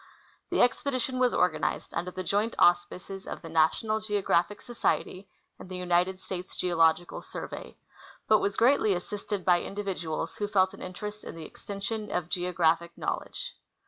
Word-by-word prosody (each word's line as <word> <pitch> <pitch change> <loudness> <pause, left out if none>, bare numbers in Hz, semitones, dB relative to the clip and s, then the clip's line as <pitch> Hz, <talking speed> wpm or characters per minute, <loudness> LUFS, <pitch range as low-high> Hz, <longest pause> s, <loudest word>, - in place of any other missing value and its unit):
The - - +4
expedition 255 0 +1
was 250 -1 +4
organized 180 -3 0
under 180 - -2
the 185 +1 -5
joint 205 +5 0
auspices 180 +2 +2
of - - -6
the 165 - -7
National 165 +7 +2
Geographic 205 -2 +1
Society 200 -5 -1 0.3
and - - -10
the 185 - -4
United 180 +1 +1
States 185 -1 -6
Geological 170 -1 +2
Survey, - - -7 0.5
but 215 - +6
was 200 0 -1
greatly 230 -5 +4
assisted 200 +2 -4
by 175 -1 +5
individuals 185 -6 -3
who 205 - -1
felt 190 -2 +3
an - - -11
in 185 - -6
terest 210 +3 -6
in - - -7
the 165 -1 -7
extension 205 +4 -5
of 175 -2 -2
geographic 170 -2 +1
knowledge. - - -3
185 Hz, 155 wpm, -29 LUFS, 175-210 Hz, 0.5 s, but